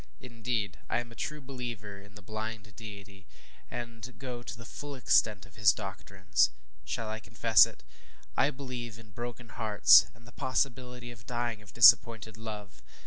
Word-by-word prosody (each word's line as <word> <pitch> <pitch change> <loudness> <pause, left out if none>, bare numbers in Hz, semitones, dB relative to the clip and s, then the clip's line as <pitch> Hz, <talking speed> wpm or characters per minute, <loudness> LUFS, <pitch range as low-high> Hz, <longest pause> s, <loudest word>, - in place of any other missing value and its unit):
Indeed, 115 -3 -3
I - - +1
am 120 -1 -7
a - - -12
true 150 +3 -4
believer 120 -7 -6
in 100 +1 -17
the 105 - -12
blind 110 0 -6
deity, 100 -3 -11 0.4
and 120 +1 -7
go 125 -3 -6
to 120 - -8
the 115 - -11
full 145 +5 -7
extent 110 -5 +3
of 95 0 -18
his 105 -3 +6
doctrines. 95 -2 0 0.3
Shall 115 - -3
I 110 0 -4
confess - - +5
it? - - -14 0.5
I 140 - +3
believe 125 -5 -6
in 110 -2 -15
broken 120 +2 -7
hearts, 105 - +6
and 115 - -20
the 120 - -14
possibility 125 -1 -2
of 115 -1 -15
dying 120 -3 -2
of 100 -2 -14
disappointed 115 -2 +6
love! 105 -3 -8
115 Hz, 165 wpm, -30 LUFS, 105-120 Hz, 0.5 s, his